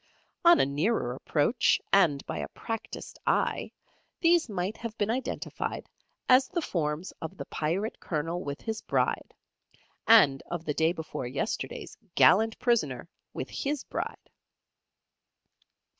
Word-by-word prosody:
On 345 Hz, 0 st, +7 dB
a -, -, +5 dB
nearer 145 Hz, -, 0 dB
approach, 150 Hz, -, +2 dB
and 160 Hz, -8 st, +4 dB
by -, -, -4 dB
a -, -, -3 dB
practised 225 Hz, -1 st, -6 dB
eye, -, -, +1 dB, 0.5 s
these 335 Hz, -5 st, +4 dB
might 195 Hz, +1 st, -2 dB
have 230 Hz, -1 st, -6 dB
been 210 Hz, 0 st, +1 dB
identified 260 Hz, +3 st, -3 dB, 0.4 s
as 255 Hz, +1 st, +6 dB
the 345 Hz, -, -2 dB
forms 155 Hz, -, -2 dB
of 170 Hz, +4 st, -6 dB
the -, -, -6 dB
Pirate 180 Hz, +8 st, -2 dB
Colonel 165 Hz, +2 st, -3 dB
with 140 Hz, 0 st, -5 dB
his 220 Hz, -1 st, -4 dB
Bride, -, -, -1 dB, 0.7 s
and 145 Hz, -12 st, +7 dB
of 170 Hz, -1 st, -4 dB
the 150 Hz, -, -1 dB
day 160 Hz, +2 st, +2 dB
before 160 Hz, -7 st, -5 dB
yesterday's 360 Hz, -, -4 dB, 0.2 s
gallant 220 Hz, +4 st, +5 dB
prisoner 170 Hz, -, 0 dB, 0.2 s
with -, -, -6 dB
his 285 Hz, 0 st, -2 dB
Bride. -, -, -5 dB
190 Hz, 130 wpm, -29 LUFS, 150-230 Hz, 0.7 s, On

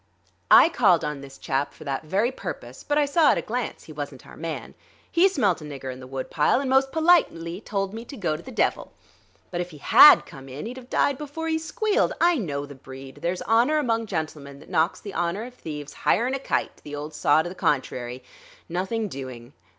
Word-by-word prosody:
I -, -, +9 dB
called 210 Hz, -, +3 dB
on 150 Hz, -2 st, -4 dB
this 135 Hz, -1 st, -11 dB
chap 135 Hz, +1 st, -2 dB
for -, -, -12 dB
that 140 Hz, -3 st, -3 dB
very 200 Hz, +10 st, +1 dB
purpose; -, -, -7 dB
but 290 Hz, -, 0 dB
I 295 Hz, -, +4 dB
saw 295 Hz, +2 st, +4 dB
at -, -, -2 dB
a -, -, 0 dB
glance 245 Hz, +1 st, -4 dB
he 155 Hz, -, -11 dB
wasn't 145 Hz, -3 st, -7 dB
our -, -, -13 dB
man. 165 Hz, 0 st, -6 dB, 0.4 s
He 360 Hz, +3 st, +5 dB
smelt 200 Hz, -, +1 dB
a -, -, -8 dB
nigger 135 Hz, -3 st, -6 dB
in 130 Hz, -, -12 dB
the 130 Hz, -, -10 dB
woodpile 135 Hz, -, +1 dB
and 275 Hz, -, -2 dB
most 265 Hz, +1 st, +3 dB
politely 305 Hz, -, +2 dB
told 195 Hz, -1 st, -2 dB
me 225 Hz, +1 st, -6 dB
to 275 Hz, -, -10 dB
go 170 Hz, -7 st, -1 dB
to 155 Hz, -, -8 dB
the -, -, -11 dB
devil. -, -, -1 dB, 0.6 s
But 175 Hz, -1 st, -2 dB
if 175 Hz, -, -5 dB
he 155 Hz, -, -12 dB
had 295 Hz, -, +8 dB
come 135 Hz, -4 st, -12 dB
in, 135 Hz, +7 st, -7 dB
he'd've 250 Hz, +2 st, -8 dB
died 280 Hz, -1 st, +1 dB
before 300 Hz, +2 st, -5 dB
he 320 Hz, 0 st, 0 dB
squealed. 430 Hz, +7 st, 0 dB
I 345 Hz, -3 st, +4 dB
know 145 Hz, -8 st, -3 dB
the 145 Hz, -, -11 dB
breed; 135 Hz, 0 st, -11 dB
there's 180 Hz, +1 st, -2 dB
honor 235 Hz, +7 st, +3 dB
among 230 Hz, -6 st, 0 dB
gentlemen 155 Hz, -6 st, -5 dB
that -, -, -15 dB
knocks 160 Hz, +3 st, +1 dB
the 200 Hz, -, -8 dB
honor 175 Hz, +5 st, -1 dB
of 250 Hz, +1 st, -9 dB
thieves 150 Hz, -, -7 dB
higher'n 245 Hz, +4 st, +1 dB
a 270 Hz, -, -1 dB
kite, -, -, -2 dB
the 145 Hz, 0 st, -7 dB
old 150 Hz, +1 st, -6 dB
saw 155 Hz, +2 st, +3 dB
to 175 Hz, -, -5 dB
the -, -, -7 dB
contrary 130 Hz, -6 st, -2 dB, 0.4 s
nothing 190 Hz, +6 st, -2 dB
doing.... 130 Hz, -5 st, -8 dB
175 Hz, 220 wpm, -25 LUFS, -, 0.6 s, I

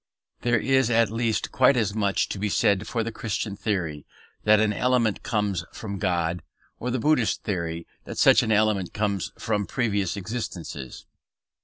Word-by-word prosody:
There 120 Hz, 0 st, +2 dB
is 130 Hz, +1 st, +2 dB
at 115 Hz, -2 st, +3 dB
least 115 Hz, -1 st, -1 dB
quite 130 Hz, +1 st, +4 dB
as 105 Hz, -4 st, +1 dB
much 100 Hz, -2 st, +1 dB
to 100 Hz, -, -4 dB
be 105 Hz, +1 st, -1 dB
said 100 Hz, +1 st, +2 dB
for 115 Hz, -2 st, -1 dB
the 115 Hz, -, -4 dB
Christian 105 Hz, -2 st, -3 dB
theory 90 Hz, -8 st, -2 dB, 0.4 s
that 105 Hz, 0 st, +6 dB
an 110 Hz, -1 st, +2 dB
element 120 Hz, -3 st, +1 dB
comes 105 Hz, -6 st, -1 dB
from 100 Hz, -3 st, -6 dB
God, 90 Hz, -3 st, 0 dB, 0.4 s
or 125 Hz, -, -3 dB
the 125 Hz, -, 0 dB
Buddhist 130 Hz, -2 st, +1 dB
theory 85 Hz, -4 st, -3 dB, 0.2 s
that -, -, -7 dB
such -, -, +6 dB
an 110 Hz, -, -1 dB
element 105 Hz, -4 st, +1 dB
comes 100 Hz, -3 st, -1 dB
from 105 Hz, -2 st, -1 dB
previous 100 Hz, -6 st, -1 dB
existences. 90 Hz, -, -6 dB
105 Hz, 165 wpm, -25 LUFS, 95-115 Hz, 0.4 s, that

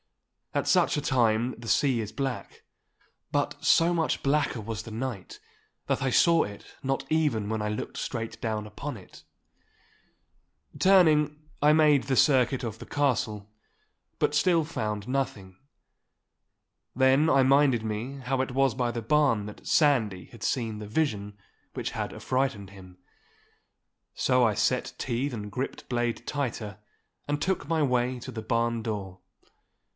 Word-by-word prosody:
At -, -, 0 dB
such -, -, +3 dB
a -, -, 0 dB
time 120 Hz, -3 st, +2 dB
the 115 Hz, 0 st, -10 dB
sea 130 Hz, -3 st, +2 dB
is 110 Hz, -1 st, -6 dB
black. 135 Hz, -1 st, -5 dB, 0.7 s
But -, -, -1 dB
so 170 Hz, +1 st, +4 dB
much 165 Hz, -2 st, 0 dB
blacker 140 Hz, -3 st, +1 dB
was 110 Hz, -2 st, -5 dB
the -, -, -9 dB
night 115 Hz, -3 st, -5 dB, 0.5 s
that -, -, -1 dB
I 135 Hz, -, +1 dB
saw 165 Hz, +5 st, +4 dB
it 100 Hz, 0 st, -10 dB
not 135 Hz, 0 st, -1 dB
even 150 Hz, -10 st, +1 dB
when 110 Hz, -1 st, -1 dB
I 105 Hz, -, -1 dB
looked 105 Hz, -, -5 dB
straight 115 Hz, -2 st, -4 dB
down 110 Hz, -2 st, -2 dB
upon 105 Hz, -, -6 dB
it. -, -, -15 dB, 1.5 s
Turning, 155 Hz, -6 st, +4 dB, 0.2 s
I 150 Hz, +1 st, +6 dB
made 150 Hz, -3 st, +4 dB
the 135 Hz, 0 st, 0 dB
circuit 130 Hz, -2 st, +3 dB
of 110 Hz, -2 st, -5 dB
the -, -, -9 dB
castle, 110 Hz, -7 st, -1 dB, 0.7 s
but -, -, +1 dB
still 165 Hz, 0 st, +3 dB
found 105 Hz, -8 st, -4 dB
nothing. 110 Hz, -8 st, -3 dB, 1.4 s
Then 135 Hz, +4 st, +4 dB
I 135 Hz, -2 st, +5 dB
minded 135 Hz, -3 st, +4 dB
me 110 Hz, +6 st, -4 dB
how 130 Hz, +1 st, 0 dB
it 130 Hz, -, -3 dB
was 135 Hz, -1 st, +2 dB
by 120 Hz, 0 st, -1 dB
the 115 Hz, -1 st, -5 dB
barn 135 Hz, -4 st, +2 dB
that 105 Hz, -, -10 dB
Sandy 115 Hz, -, +2 dB
had 115 Hz, -2 st, -13 dB
seen 110 Hz, -2 st, -1 dB
the 105 Hz, -, -7 dB
vision 105 Hz, -6 st, -1 dB, 0.4 s
which -, -, -3 dB
had -, -, -4 dB
affrighted 130 Hz, -7 st, -2 dB
him. 95 Hz, -2 st, -14 dB, 1.2 s
So 125 Hz, -1 st, +2 dB
I 110 Hz, -2 st, +1 dB
set 125 Hz, +4 st, 0 dB
teeth 130 Hz, +3 st, -2 dB
and 105 Hz, -4 st, -6 dB
gripped 130 Hz, +5 st, -5 dB
blade 120 Hz, -1 st, -2 dB
tighter, 115 Hz, -8 st, -3 dB, 0.5 s
and 145 Hz, 0 st, -1 dB
took 185 Hz, -6 st, -1 dB
my 160 Hz, -2 st, +2 dB
way 125 Hz, -1 st, 0 dB
to -, -, -8 dB
the 110 Hz, -, -5 dB
barn 115 Hz, +1 st, 0 dB
door. 100 Hz, -4 st, -5 dB
125 Hz, 150 wpm, -27 LUFS, 110-140 Hz, 1.5 s, I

